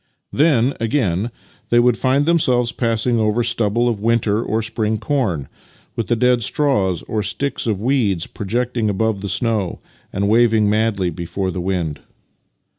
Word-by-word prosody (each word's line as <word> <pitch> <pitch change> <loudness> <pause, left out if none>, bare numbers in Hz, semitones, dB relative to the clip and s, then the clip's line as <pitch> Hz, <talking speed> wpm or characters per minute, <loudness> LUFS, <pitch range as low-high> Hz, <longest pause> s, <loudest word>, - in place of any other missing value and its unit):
Then, 140 -4 +3
again, 110 -4 0 0.4
they 120 - +4
would 120 -1 +4
find 135 +4 +1
themselves 125 -8 +2
passing 115 0 0
over 110 +2 +1
stubble 115 0 +1
o£ 105 - -10
winter 110 -1 +1
or 110 -1 -1
spring 110 -1 -1
corn, 105 - -1 0.5
with 115 - -3
the 120 - +2
dead 125 +1 +2
straw 110 -8 +1
or 110 - -1
sticks 115 +6 -2
of 105 -4 0
weeds 110 -8 +1
projecting 115 +2 -2
above 105 0 -1
the 100 - -4
snow 105 -2 -1 0.3
and 100 +1 -1
waving 110 -1 +3
madly 105 -4 +1
before 95 +3 -3
the 90 - -4
w^ind. 85 -5 -2
110 Hz, 150 wpm, -19 LUFS, 100-120 Hz, 0.5 s, they